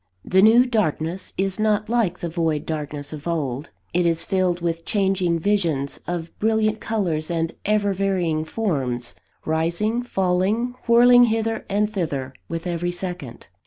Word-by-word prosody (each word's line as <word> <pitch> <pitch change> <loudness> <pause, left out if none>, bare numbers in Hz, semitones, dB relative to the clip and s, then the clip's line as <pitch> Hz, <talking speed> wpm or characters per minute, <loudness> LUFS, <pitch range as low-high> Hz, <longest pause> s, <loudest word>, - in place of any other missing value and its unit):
The 190 +1 +4
new 230 +4 +7
darkness 185 - -1
is 195 +1 -1
not 215 -1 +1
like 220 -6 0
the 175 - -2
void 160 -3 -1
darkness 150 -2 -4
of 150 +1 -7
old; 145 -4 -2 0.2
it 180 +1 +2
is 165 -1 +1
filled 185 -2 +1
with 165 -1 -2
changing 190 -4 +1
visions 165 -7 0
of 175 -1 -4
brilliant 220 0 +1
colours 175 -8 -1
and 165 -1 -1
ever 205 -1 +2
varying 180 -5 0
forms, 135 - -2 0.3
rising, 170 +9 0
falling, 200 +2 0
whirling 245 +1 +7
hither 225 -1 -1
and 210 +1 +2
thither 150 -10 -3 0.2
with 165 +1 -4
every 175 0 -1
second. 175 -7 -6
180 Hz, 145 wpm, -23 LUFS, 160-210 Hz, 0.3 s, new